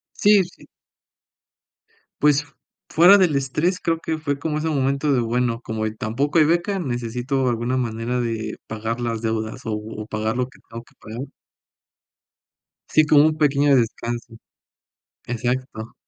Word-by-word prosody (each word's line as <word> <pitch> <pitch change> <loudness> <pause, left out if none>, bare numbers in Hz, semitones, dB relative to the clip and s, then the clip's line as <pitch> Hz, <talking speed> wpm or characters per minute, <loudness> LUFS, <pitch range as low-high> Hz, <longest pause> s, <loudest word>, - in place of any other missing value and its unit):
Sí, 205 -1 +5
sí. - - -16 1.5
Pues, 145 0 +4 0.4
fuera 180 +5 +7
del 175 -6 +3
estrés, 150 +7 0
creo 165 -1 0
que 160 -1 -3
fue 145 -2 -2
como 150 0 -2
ese 160 +1 -1
momento 140 0 +1
de: 125 - +3
"Bueno, 120 0 0
como 110 -2 -4
tampoco 135 +10 0
hay 155 - +7
beca, 175 +5 +1
necesito 125 -1 -2
alguna 120 +2 -1
manera 120 0 -2
de 110 -2 -3
pagar 110 +2 -3
las 115 -2 -2
deudas 110 +2 -3
o 110 - -3
o 105 0 -6
pagar 110 +1 -2
lo 125 0 -1
que - - -20
tengo 115 +1 -8
que - - -25
pagar". 120 +6 -7 1.6
Sí, 155 0 +4
como 150 0 +6
un 155 - +1
pequeño 145 -1 +3
descanso. 120 0 -2 0.9
Exacto. 120 -1 -3
125 Hz, 145 wpm, -22 LUFS, 115-150 Hz, 1.6 s, fuera